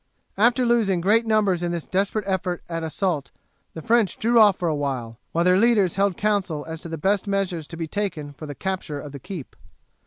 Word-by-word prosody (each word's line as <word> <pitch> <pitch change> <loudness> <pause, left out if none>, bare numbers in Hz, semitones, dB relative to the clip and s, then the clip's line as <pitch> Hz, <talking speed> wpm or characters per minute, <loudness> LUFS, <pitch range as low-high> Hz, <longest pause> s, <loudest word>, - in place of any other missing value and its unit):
After 235 +4 +3
losing 225 -6 +2
great 220 +6 +3
numbers 205 -5 +2
in 175 -1 -1
this 170 -2 -3
desperate 200 +2 0
effort 185 -2 -2
at 165 -1 -3
assault 160 -2 -1 0.5
the 160 - -7
French 230 -5 +2
drew 235 +1 +3
off 205 -3 +6
for 175 - -1
a 160 - +1
while, 130 -6 -3
while 170 - +1
their 180 +1 +5
leaders 210 -6 +3
held 195 -2 +1
council 195 -8 0
as 160 0 -6
to 170 - -7
the 165 - -4
best 195 +6 +1
measures 185 -6 -1
to 165 - -9
be 165 -1 -3
taken 160 -6 -3
for 155 +2 -9
the 145 - -6
capture 185 -4 -3
of 145 0 -8
the 140 - -8
keep. 175 - -8
185 Hz, 215 wpm, -23 LUFS, 160-205 Hz, 0.5 s, off